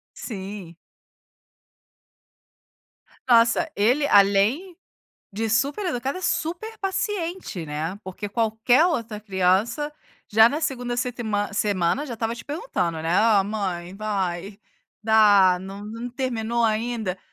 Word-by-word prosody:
Sim. 195 Hz, -5 st, -7 dB, 2.5 s
Nossa, 230 Hz, -1 st, +4 dB
ele, 250 Hz, +8 st, +2 dB
além 205 Hz, -, +3 dB, 0.6 s
de 220 Hz, +3 st, -2 dB
super 280 Hz, -, +1 dB
educado, 270 Hz, 0 st, -2 dB
é -, -, -8 dB
super 350 Hz, +6 st, -2 dB
paciente, 370 Hz, -, -3 dB
né, 155 Hz, +6 st, -4 dB
porque 190 Hz, +2 st, -6 dB
qualquer 225 Hz, +7 st, +2 dB
outra 230 Hz, -11 st, -2 dB
criança 205 Hz, +9 st, 0 dB, 0.4 s
já 220 Hz, +2 st, +6 dB
na 295 Hz, +5 st, -3 dB
2º 245 Hz, -5 st, -2 dB
setman 220 Hz, -5 st, -2 dB
semana 200 Hz, -, 0 dB
já 245 Hz, -, -5 dB
estava 225 Hz, 0 st, -2 dB
te 235 Hz, -, -10 dB
perguntando, 285 Hz, -, -3 dB
né: 165 Hz, -, -2 dB
"Ah, 215 Hz, -3 st, +4 dB
mãe, 190 Hz, -4 st, -4 dB
vai, 195 Hz, -2 st, -3 dB, 0.4 s
dá, 205 Hz, -4 st, +5 dB
não 195 Hz, +2 st, -8 dB
não 230 Hz, +3 st, -6 dB
terminou 235 Hz, -2 st, -1 dB
ainda?" 220 Hz, -3 st, -1 dB
220 Hz, 115 wpm, -24 LUFS, 195-250 Hz, 2.5 s, já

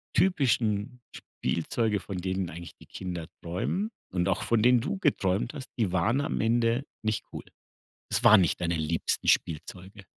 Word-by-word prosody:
typischen 125 Hz, -, +1 dB
Spielzeuge, 105 Hz, +5 st, -2 dB
von 100 Hz, -1 st, -6 dB
denen 95 Hz, 0 st, -2 dB
eigentlich 85 Hz, +2 st, -9 dB
die -, -, -16 dB
Kinder 90 Hz, -3 st, -6 dB, 0.2 s
träumen 95 Hz, -, -2 dB, 0.2 s
und 90 Hz, -1 st, 0 dB
auch 95 Hz, +3 st, 0 dB
von 110 Hz, +1 st, +2 dB
denen 125 Hz, 0 st, +5 dB
du 165 Hz, -, -2 dB
geträumt 105 Hz, -, +1 dB
hast, 140 Hz, -3 st, -8 dB
die 105 Hz, -6 st, +1 dB
waren 100 Hz, +10 st, +2 dB
am 150 Hz, -, -2 dB
Ende 115 Hz, +2 st, +2 dB, 0.2 s
nicht 110 Hz, -1 st, -1 dB
gut. -, -, -10 dB, 0.6 s
Es 120 Hz, -, 0 dB
waren 110 Hz, -3 st, +9 dB
nicht 85 Hz, -, +1 dB
deine 85 Hz, -1 st, 0 dB
liebsten 80 Hz, +1 st, -1 dB
Spielzeuge? 95 Hz, +5 st, -1 dB
105 Hz, 160 wpm, -28 LUFS, 90-120 Hz, 0.6 s, waren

